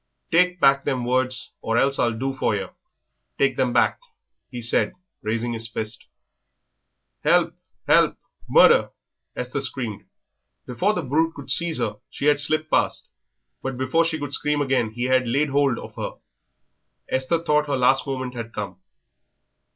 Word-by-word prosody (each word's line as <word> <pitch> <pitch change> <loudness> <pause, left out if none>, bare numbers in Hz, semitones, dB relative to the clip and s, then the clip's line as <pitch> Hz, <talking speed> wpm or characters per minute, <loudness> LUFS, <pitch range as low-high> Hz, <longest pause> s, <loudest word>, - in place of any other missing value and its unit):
"Take 180 +2 +3
back 140 -2 +4
them 130 -3 -1
words, 130 0 -1
or 115 +1 0
else 135 +2 +2
I'll 120 - +3
do 135 +3 -2
for 130 -5 0
yer; 100 - -4 0.7
take 135 -2 +2
them 130 -1 +1
back," - - +2 0.5
he 125 - -6
said, 115 0 +1 0.3
raising 115 +2 -2
his 115 0 -4
fist. 110 -1 -6 1.2
"Help, - - +3 0.3
help, - - +4 0.3
murder!" - - +6 0.5
Esther 125 +3 -3
screamed. 120 -5 -4 0.6
Before 185 - 0
the 180 - -2
brute 160 +5 +1
could 135 -2 -7
seize 170 +2 +1
her 105 -1 -2
she - - -5
had 145 -1 +4
slipped 155 +1 0
past, - - +1 0.5
but 135 -1 -4
before 130 +6 +2
she 165 -1 -1
could 145 -2 -5
scream 150 +1 +1
again 130 -5 +1
he 120 +3 -5
had 130 -1 +2
laid 140 +5 +1
hold 140 -2 +2
of - - -9
her. - - -5 0.9
Esther 130 +6 0
thought 150 -2 +2
her 140 -2 0
last 130 +2 +3
moment 130 -2 -3
had 115 -2 -7
come. 95 -3 -5
130 Hz, 160 wpm, -23 LUFS, 120-145 Hz, 1.2 s, murder